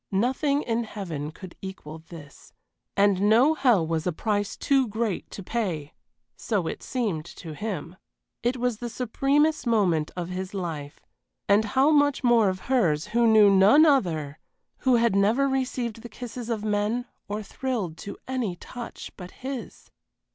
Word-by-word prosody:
Nothing 265 +8 +1
in 230 0 0
heaven 170 -10 -5
could 185 +2 -11
equal 160 -5 -8
this, 160 -3 -13 0.4
and 200 -1 +4
no 250 +8 +5
hell 245 - +3
was 165 +1 -1
a - - +2
price 205 +4 -2
too 270 -3 +2
great 220 -2 -2
to 200 - -8
pay 180 -10 -3 0.4
so 205 -6 -1
it - - -4
seemed 210 -12 -2
to 165 -1 -9
him. 185 -1 -5 0.4
It 245 +2 0
was 245 -3 -1
the 240 - -4
supremest 275 +5 +1
moment 180 -9 +2
of 175 -1 -3
his 185 +2 -5
life; 160 -6 -5 0.5
and 205 +2 +5
how 265 +8 +3
much 290 -2 +3
more 235 -4 +5
of 185 0 -4
hers 195 - +1
who 235 0 +4
knew 215 -2 +7
none 200 +11 +7
other, 165 - +1 0.4
who 260 -2 +3
had 235 -3 +3
never 220 +8 +3
received 255 -4 -2
the 240 - -9
kisses 245 -1 -7
of 220 -3 -2
men 210 +3 0 0.2
or 210 +1 -4
thrilled 215 -7 -3
to 200 - -8
any 250 -8 -2
touch 240 +6 -8
but 180 -2 -9
his! 260 +2 -8
215 Hz, 160 wpm, -26 LUFS, 180-245 Hz, 0.5 s, knew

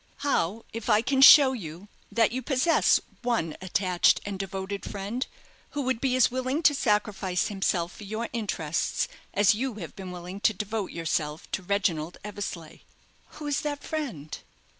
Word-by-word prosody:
How 225 -5 0
if 230 +1 -5
I 215 0 +4
can 265 +2 +1
show 270 -1 +10
you 180 -4 -8 0.2
that 225 -2 +3
you 255 +2 -2
possess 270 +5 +3 0.2
one 230 -10 -1
attached 185 -1 +2
and 200 -2 -5
devoted 195 +1 -4
friend, 205 +6 -4 0.5
who 285 - 0
would 255 -3 -1
be 260 -2 +1
as 255 - +4
willing 260 +5 -1
to 295 - +6
sacrifice 210 -7 0
himself 190 -3 -1
for - - -10
your 220 +3 -4
interests 170 -9 -1 0.2
as 205 +2 +4
you 245 +2 -2
have 175 -7 -8
been 190 -2 -7
willing 180 +2 -7
to 220 0 +2
devote 210 0 -3
yourself 160 -2 -3
to - - -2
Reginald 180 -4 -1
Eversleigh?" 195 -6 -6 0.5
"Who 305 - -8
is 290 -1 0
that 290 -1 -4
friend?" 230 - -4
205 Hz, 160 wpm, -27 LUFS, 185-250 Hz, 0.5 s, show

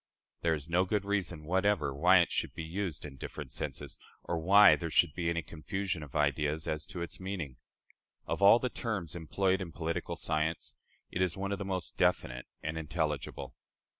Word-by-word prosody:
There 85 -1 +2
is 75 -1 -6
no 90 +2 +3
good 100 +1 -1
reason 95 -6 -1
whatever 95 -3 +1
why 90 +6 +6
it 85 - 0
should - - -1
be 80 - -4
used 85 -2 -3
in 70 -2 -9
different 70 0 -7
senses, - - -4 0.2
or 85 - -2
why 100 +5 +8
there 85 - -4
should 75 - +3
be 85 -1 -1
any 85 -1 -1
confusion 90 +3 -3
of 75 -1 -10
ideas 75 +1 +1
as 75 +1 -2
to 95 -4 -5
its 85 - -6
meaning. 95 -8 -5 0.7
Of - - -3
all 100 +3 +9
the 125 +1 -1
terms 95 -9 -3
employed 95 +3 0
in 85 -3 -5
political 85 +2 -3
science, 80 0 -1 0.4
it 90 - -2
is 90 -1 +1
one 100 +1 -2
of 100 - -2
the 100 - -3
most 95 -2 -4
definite 60 0 +1 0.2
and 80 +1 -2
intelligible. 75 -2 -3
85 Hz, 190 wpm, -32 LUFS, 75-95 Hz, 0.7 s, all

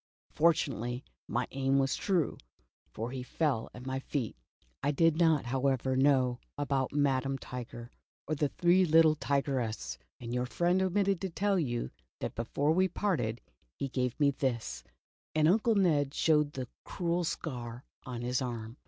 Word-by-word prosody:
Fortunately, 130 -7 +1 0.2
my - - -1
aim 135 0 +1
was 135 -1 +2
true, 180 -6 0 0.5
for 115 +3 -4
he 130 -1 -4
fell 130 -3 -1
at 125 - -10
my 130 0 -2
feet. 135 -4 -3 0.5
I - - +1
did 165 +2 +3
not, 160 -4 +3
however, 130 +1 +1
know 130 -2 +3 0.2
about 140 -2 0
Madam 135 -2 +1
Tiger 120 -2 -8 0.4
or 155 - 0
the 145 -1 +1
three 180 +4 +4
little 160 -2 +6
Tigerses, 130 - -1 0.2
and 120 0 -5
your 125 0 0
friend 175 +7 +2
omitted 190 0 +1
to 190 - -2
tell 195 +2 +1
you 120 - -2 0.3
that - - -3
before 140 +6 0
we 185 +3 +4
parted 155 - -1 0.4
he 140 - -3
gave 125 +1 -1
me 145 -1 +5
this," 115 - -2 0.5
and 155 0 +4
Uncle 220 +5 +3
Ned 150 -8 +2
showed 150 -2 +3
the 130 -2 -4 0.2
cruel 175 -1 -1
scar 125 -6 -4 0.2
on 120 -2 -5
his 125 +1 0
arm. 115 -1 -5
135 Hz, 155 wpm, -31 LUFS, 125-160 Hz, 0.5 s, little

